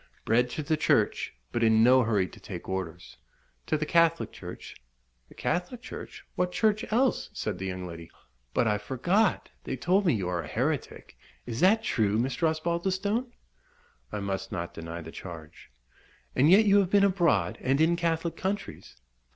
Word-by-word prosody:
Bred 120 Hz, +2 st, +3 dB
to 155 Hz, -, -4 dB
the 155 Hz, +1 st, 0 dB
church, -, -, +1 dB, 0.2 s
but 120 Hz, -, -1 dB
in 110 Hz, -1 st, +5 dB
no 130 Hz, +2 st, +6 dB
hurry 105 Hz, -5 st, +1 dB
to -, -, -14 dB
take -, -, -8 dB
orders." 90 Hz, -3 st, -5 dB, 0.5 s
"To -, -, +1 dB
the 155 Hz, -, -2 dB
Catholic 165 Hz, +1 st, +2 dB
Church?" -, -, -9 dB, 0.5 s
"The -, -, -17 dB
Catholic 180 Hz, +8 st, -2 dB
Church? -, -, -9 dB
what 180 Hz, 0 st, 0 dB
Church 215 Hz, +2 st, +1 dB
else?" 255 Hz, +4 st, +1 dB
said -, -, -4 dB
the 95 Hz, -, -3 dB
young 90 Hz, -1 st, -4 dB
lady. 85 Hz, -1 st, -9 dB, 0.5 s
"But 120 Hz, -, +3 dB
I 105 Hz, -1 st, +1 dB
forgot 175 Hz, -, 0 dB
they -, -, -3 dB
told 185 Hz, +7 st, +2 dB
me 145 Hz, -, +4 dB
you 95 Hz, -4 st, -2 dB
are 90 Hz, -1 st, -1 dB
a -, -, -8 dB
heretic. -, -, -3 dB, 0.3 s
Is 120 Hz, -1 st, -5 dB
that 220 Hz, +5 st, +4 dB
true, 105 Hz, -, +1 dB
Mr. 130 Hz, +7 st, +1 dB
Osbaldistone?" 190 Hz, +9 st, -1 dB, 0.8 s
"I 105 Hz, -, -3 dB
must 100 Hz, +1 st, -3 dB
not 85 Hz, -4 st, -4 dB
deny 85 Hz, +1 st, -7 dB
the 80 Hz, 0 st, -9 dB
charge." 80 Hz, -4 st, -10 dB, 0.7 s
"And 140 Hz, +4 st, +4 dB
yet 205 Hz, +5 st, +7 dB
you 205 Hz, 0 st, +6 dB
have 190 Hz, -3 st, +1 dB
been 200 Hz, 0 st, +4 dB
abroad, 185 Hz, -4 st, +2 dB
and 135 Hz, +2 st, +1 dB
in 165 Hz, +2 st, +4 dB
Catholic 165 Hz, -1 st, -1 dB
countries?" 200 Hz, +2 st, -4 dB
150 Hz, 175 wpm, -28 LUFS, -, 0.8 s, yet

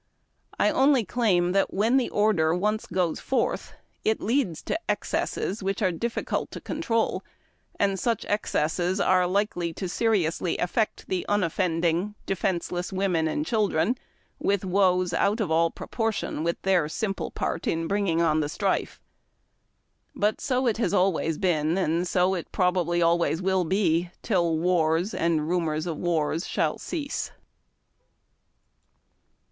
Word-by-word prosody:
I -, -, +4 dB
only 265 Hz, -4 st, +3 dB
claim 185 Hz, -5 st, +2 dB
that 195 Hz, +1 st, +2 dB
when 225 Hz, +6 st, +3 dB
the 260 Hz, -, +1 dB
order 180 Hz, -7 st, +2 dB
once 210 Hz, +4 st, -1 dB
o:oes 180 Hz, -3 st, 0 dB
forth 265 Hz, -, -1 dB, 0.3 s
it 220 Hz, -, +1 dB
leads 220 Hz, -, 0 dB
to 325 Hz, -, -2 dB
excesses, 205 Hz, +3 st, -1 dB
which 195 Hz, 0 st, -2 dB
it 185 Hz, -4 st, +1 dB
is 165 Hz, -, -8 dB
difficult 235 Hz, 0 st, -2 dB
to -, -, -7 dB
control, 240 Hz, -8 st, -1 dB, 0.6 s
and 195 Hz, -1 st, +1 dB
such 230 Hz, 0 st, -1 dB
excesses 180 Hz, -2 st, 0 dB
are 185 Hz, -2 st, +3 dB
likely 180 Hz, -3 st, -1 dB
to 190 Hz, -, -4 dB
seriously 180 Hz, -5 st, 0 dB
affect 215 Hz, +5 st, -1 dB
the 185 Hz, -1 st, -1 dB
unoffending, 180 Hz, 0 st, 0 dB
defenceless 180 Hz, -1 st, -2 dB
women 185 Hz, -4 st, +1 dB
and 300 Hz, -, -1 dB
children 215 Hz, -, +1 dB, 0.4 s
with 200 Hz, -1 st, 0 dB
woes 185 Hz, -2 st, +2 dB
out 205 Hz, +6 st, +1 dB
of 205 Hz, -7 st, -1 dB
all 165 Hz, +1 st, +3 dB
proportion 225 Hz, -5 st, -3 dB
with 170 Hz, 0 st, -1 dB
their 185 Hz, -4 st, +3 dB
simi)le 195 Hz, +5 st, -3 dB
part 165 Hz, -, -2 dB
in 165 Hz, 0 st, 0 dB
bringing 190 Hz, -4 st, +1 dB
on 155 Hz, -1 st, +2 dB
the 145 Hz, -1 st, -1 dB
strife. 190 Hz, +4 st, -1 dB, 1.2 s
But 210 Hz, +1 st, 0 dB
so 260 Hz, -1 st, 0 dB
it 230 Hz, -2 st, +1 dB
always 190 Hz, -4 st, +2 dB
has 165 Hz, -2 st, -1 dB
been, 165 Hz, -2 st, +1 dB
and 175 Hz, -1 st, 0 dB
so 180 Hz, +2 st, +2 dB
it 175 Hz, -3 st, -5 dB
probably 180 Hz, -2 st, +1 dB
always 170 Hz, -1 st, +2 dB
will 190 Hz, -1 st, +1 dB
be, 175 Hz, -2 st, +1 dB
till 170 Hz, -6 st, +1 dB
wars 170 Hz, +2 st, +1 dB
and 160 Hz, -2 st, 0 dB
rumors 160 Hz, -3 st, 0 dB
of 165 Hz, -3 st, -3 dB
wars 165 Hz, -1 st, -1 dB
shall -, -, 0 dB
cease. 295 Hz, -4 st, -4 dB
185 Hz, 140 wpm, -26 LUFS, 170-205 Hz, 1.2 s, I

